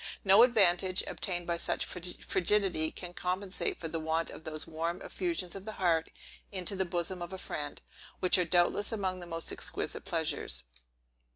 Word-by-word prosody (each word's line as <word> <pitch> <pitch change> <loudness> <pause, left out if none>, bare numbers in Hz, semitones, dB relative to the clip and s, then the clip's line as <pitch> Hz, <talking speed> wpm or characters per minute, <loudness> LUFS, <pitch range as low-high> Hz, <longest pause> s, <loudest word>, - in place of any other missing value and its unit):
No 195 0 +7
advantage, 190 -6 +5
obtained 175 -3 -2
by 170 0 -1
such - - -1
frigidity, 180 -1 +1
can 175 +1 -7
compensate 185 +2 -1
for 165 - -3
the 165 0 -3
want 160 +1 -1
of - - -11
those 155 -1 -3
warm 165 +2 -3
effusions 335 - -2
of 195 - -7
the 215 +1 -6
heart 170 -5 +1 0.4
into 190 0 -1
the 190 0 0
bosom 175 +1 -2
of 175 +1 -5
a 190 - -5
friend, 145 -5 -4 0.4
which 185 0 +4
are 180 - +3
doubtless 175 +5 +3
among 190 -4 -1
the 175 - -8
most 165 -1 -2
exquisite - - -2
pleasures. - - 0
180 Hz, 170 wpm, -31 LUFS, 165-190 Hz, 0.4 s, No